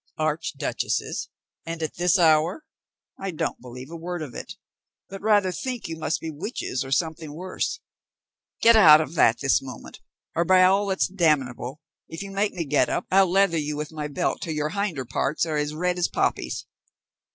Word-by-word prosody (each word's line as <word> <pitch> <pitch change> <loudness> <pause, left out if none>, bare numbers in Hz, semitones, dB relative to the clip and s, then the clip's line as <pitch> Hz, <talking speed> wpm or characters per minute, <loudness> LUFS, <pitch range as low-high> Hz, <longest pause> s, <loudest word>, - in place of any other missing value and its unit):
"Archduchesses, 155 -2 -2 0.4
and 165 0 -5
at 155 - -3
this 180 +3 +2
hour? 165 - +3 0.5
I 195 - -3
don't 160 - -3
believe 125 +3 -10
a - - -6
word 170 0 -5
of 135 -5 -8
it, - - -7 0.6
but 195 0 -8
rather 205 -3 +3
think 250 +4 -4
you 165 - -5
must 155 -1 -2
be 160 - -5
witches 150 - -4
or 135 - -9
something 160 0 -1
worse. 185 - -3 0.8
Get 230 0 +8
out 155 -8 +9
of 155 -1 -3
that 120 -8 +3
this 135 -1 +3
moment, 130 -4 -10 0.3
or, 170 - +1
by 185 +1 +5
all 195 +2 +4
that's 190 -1 +1
damnable, 150 -7 0 0.3
if 165 +4 -6
you 195 - -8
make 200 +1 0
me 170 -3 -3
get 140 -3 +2
up - - -1
I'll 190 -1 +5
leather 190 -3 +3
you 150 0 -3
with 150 +1 -4
my 150 -2 -4
belt 175 +5 -2
till 160 - -3
your 150 0 -1
hinder 180 -7 -2
parts 135 +6 -1
are 155 -2 -2
as 150 0 -2
red 180 +2 -1
as 175 - +2
poppies." 60 - -1
165 Hz, 185 wpm, -25 LUFS, 150-185 Hz, 0.8 s, out